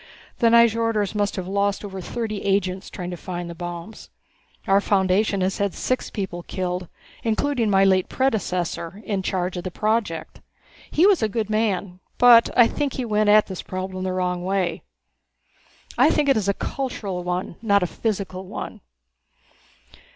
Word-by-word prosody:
The 235 Hz, -, +4 dB
Nyjorders 230 Hz, -3 st, +3 dB
must 205 Hz, -1 st, 0 dB
have 185 Hz, -2 st, -4 dB
lost 200 Hz, +1 st, 0 dB
over 190 Hz, -1 st, -6 dB
thirty 215 Hz, +1 st, -4 dB
agents 195 Hz, -1 st, -1 dB
trying 180 Hz, -2 st, -6 dB
to 175 Hz, -, -5 dB
find 175 Hz, -1 st, -5 dB
the 170 Hz, -, -6 dB
bombs. 175 Hz, +4 st, -8 dB, 0.6 s
Our 195 Hz, +1 st, +4 dB
foundation 195 Hz, 0 st, +2 dB
has 190 Hz, +1 st, -1 dB
had 200 Hz, -2 st, 0 dB
six 255 Hz, -, -1 dB
people 190 Hz, -4 st, -4 dB
killed 180 Hz, 0 st, -3 dB, 0.3 s
including 230 Hz, +1 st, 0 dB
my 195 Hz, -1 st, +4 dB
late 190 Hz, -1 st, +3 dB
predecessor 190 Hz, -6 st, -2 dB
in 200 Hz, -3 st, -1 dB
charge 185 Hz, -1 st, -2 dB
of 175 Hz, -, -4 dB
the 185 Hz, -, -3 dB
project. 210 Hz, -4 st, -2 dB, 0.5 s
He 330 Hz, -, +3 dB
was 395 Hz, -7 st, +5 dB
a 220 Hz, -, +1 dB
good 215 Hz, 0 st, -2 dB
man, 200 Hz, -4 st, -1 dB, 0.2 s
but 240 Hz, -2 st, +7 dB
I 240 Hz, -, +8 dB
think 280 Hz, +3 st, -1 dB
he 255 Hz, -, -3 dB
went 210 Hz, -1 st, +2 dB
at 210 Hz, 0 st, +6 dB
this 190 Hz, -2 st, -6 dB
problem 185 Hz, 0 st, -5 dB
the 185 Hz, -, -1 dB
wrong 180 Hz, -1 st, -1 dB
way. 185 Hz, -2 st, -1 dB, 1.2 s
I 265 Hz, +5 st, +6 dB
think 300 Hz, -2 st, +1 dB
it 275 Hz, -, +5 dB
is 200 Hz, -2 st, 0 dB
a 200 Hz, -, +1 dB
cultural 205 Hz, -9 st, -4 dB
one, 180 Hz, -1 st, -3 dB
not 200 Hz, -4 st, +3 dB
a -, -, +2 dB
physical 190 Hz, -1 st, -3 dB
one." -, -, -7 dB
195 Hz, 165 wpm, -23 LUFS, 185-220 Hz, 1.2 s, I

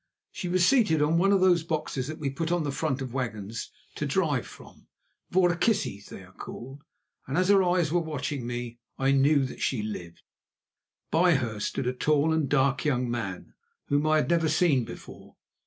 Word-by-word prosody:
She 180 Hz, -, -5 dB
was 180 Hz, 0 st, +3 dB
seated 215 Hz, -, +4 dB
on 160 Hz, +3 st, +2 dB
one 195 Hz, +2 st, +3 dB
of 195 Hz, -2 st, +3 dB
those 180 Hz, -2 st, +4 dB
boxes 155 Hz, -5 st, -3 dB
that 155 Hz, +1 st, -6 dB
we 145 Hz, -4 st, -3 dB
put 165 Hz, +4 st, -3 dB
on 175 Hz, -2 st, +1 dB
the 145 Hz, -, -2 dB
front 135 Hz, -2 st, -2 dB
of 125 Hz, -2 st, -7 dB
wagons 115 Hz, -4 st, -4 dB, 0.2 s
to -, -, -3 dB
drive -, -, 0 dB
from, -, -, -15 dB, 0.4 s
voorkissies 175 Hz, -, +1 dB
they 95 Hz, -, -10 dB
are 90 Hz, -, -16 dB
called, 135 Hz, +8 st, -9 dB, 0.4 s
and 135 Hz, +3 st, -2 dB
as 185 Hz, +1 st, +2 dB
her 200 Hz, -1 st, +6 dB
eyes 175 Hz, -4 st, +1 dB
were 175 Hz, -, +3 dB
watching 145 Hz, -5 st, -4 dB
me 120 Hz, -1 st, -5 dB, 0.2 s
I 135 Hz, 0 st, +2 dB
knew 140 Hz, +1 st, +4 dB
that 130 Hz, -, -8 dB
she 120 Hz, -6 st, 0 dB
lived. 90 Hz, -6 st, -7 dB, 0.9 s
By 170 Hz, +1 st, +4 dB
her 115 Hz, -6 st, -2 dB
stood 115 Hz, -, -2 dB
a 125 Hz, -, 0 dB
tall 150 Hz, +4 st, +2 dB
and 155 Hz, -4 st, 0 dB
dark 135 Hz, -2 st, +2 dB
young 125 Hz, -5 st, 0 dB
man 100 Hz, -7 st, -5 dB, 0.4 s
whom 145 Hz, +1 st, +2 dB
I 155 Hz, -, +4 dB
had 155 Hz, -, +1 dB
never 165 Hz, -2 st, +2 dB
seen 145 Hz, -10 st, +2 dB
before. -, -, -11 dB
145 Hz, 190 wpm, -27 LUFS, 125-170 Hz, 0.9 s, her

